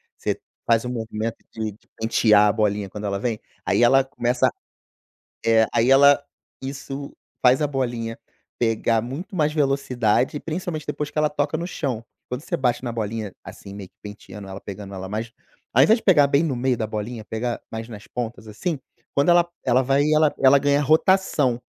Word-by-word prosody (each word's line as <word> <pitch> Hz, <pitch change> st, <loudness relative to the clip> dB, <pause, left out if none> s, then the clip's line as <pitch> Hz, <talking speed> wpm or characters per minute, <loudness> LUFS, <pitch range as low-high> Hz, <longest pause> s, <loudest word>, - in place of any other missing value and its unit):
Você -, -, -2 dB, 0.3 s
faz 115 Hz, 0 st, +3 dB
um -, -, -3 dB
movimento 115 Hz, -1 st, -3 dB
de 110 Hz, -1 st, -3 dB
de 105 Hz, -, -21 dB
pentear 105 Hz, -2 st, +4 dB
a -, -, +4 dB
bolinha 105 Hz, -2 st, 0 dB
quando 105 Hz, +2 st, -7 dB
ela 100 Hz, 0 st, -1 dB
vem, 110 Hz, 0 st, -2 dB, 0.3 s
aí -, -, +2 dB
ela 135 Hz, +3 st, +6 dB
começa, 125 Hz, -1 st, +1 dB, 1.0 s
é, 115 Hz, -1 st, +5 dB
aí 115 Hz, +3 st, +3 dB
ela, 140 Hz, +1 st, +7 dB, 0.4 s
isso, 135 Hz, +1 st, -6 dB, 0.3 s
faz 130 Hz, +3 st, +5 dB
a -, -, +3 dB
bolinha 120 Hz, -5 st, -3 dB, 0.4 s
pegar 115 Hz, -1 st, +1 dB
muito 145 Hz, -, -6 dB
mais 155 Hz, -4 st, +1 dB
velocidade, 135 Hz, -4 st, +1 dB
principalmente 165 Hz, -2 st, -4 dB
depois 150 Hz, 0 st, -3 dB
que -, -, -31 dB
ela 150 Hz, 0 st, +3 dB
toca 145 Hz, +1 st, -1 dB
no 170 Hz, -, -3 dB
chão. 130 Hz, -10 st, -3 dB, 0.2 s
Quando 125 Hz, +1 st, -4 dB
você -, -, -2 dB
bate 125 Hz, -2 st, 0 dB
na 120 Hz, -, -3 dB
bolinha, 110 Hz, -2 st, -3 dB
assim, 100 Hz, 0 st, -10 dB
meio 100 Hz, -2 st, -8 dB
que -, -, -52 dB
penteando 105 Hz, -1 st, -10 dB
ela, 95 Hz, +1 st, -7 dB
pegando 100 Hz, 0 st, -8 dB
ela 95 Hz, 0 st, -6 dB
mais 110 Hz, +3 st, -4 dB, 0.4 s
ao 130 Hz, -, +7 dB
invés 220 Hz, -, +5 dB
de -, -, -14 dB
pegar 160 Hz, -7 st, +6 dB
bem 140 Hz, +2 st, +3 dB
no 150 Hz, -6 st, -1 dB
meio 125 Hz, +1 st, +1 dB
da 110 Hz, -, -2 dB
bolinha, 110 Hz, +2 st, -5 dB
pegar 115 Hz, +2 st, -3 dB
mais 110 Hz, 0 st, -5 dB
nas 105 Hz, -4 st, -10 dB
pontas, 115 Hz, -2 st, -5 dB
assim, 150 Hz, -, -3 dB, 0.4 s
quando 140 Hz, +3 st, +2 dB
ela 175 Hz, 0 st, +5 dB, 0.2 s
ela 130 Hz, 0 st, +3 dB
vai 135 Hz, +2 st, +2 dB
ela 155 Hz, -1 st, +4 dB
ela 135 Hz, +1 st, +7 dB
ganha 145 Hz, +1 st, +2 dB
rotação, 150 Hz, -4 st, +3 dB
125 Hz, 190 wpm, -23 LUFS, 110-140 Hz, 1.0 s, ela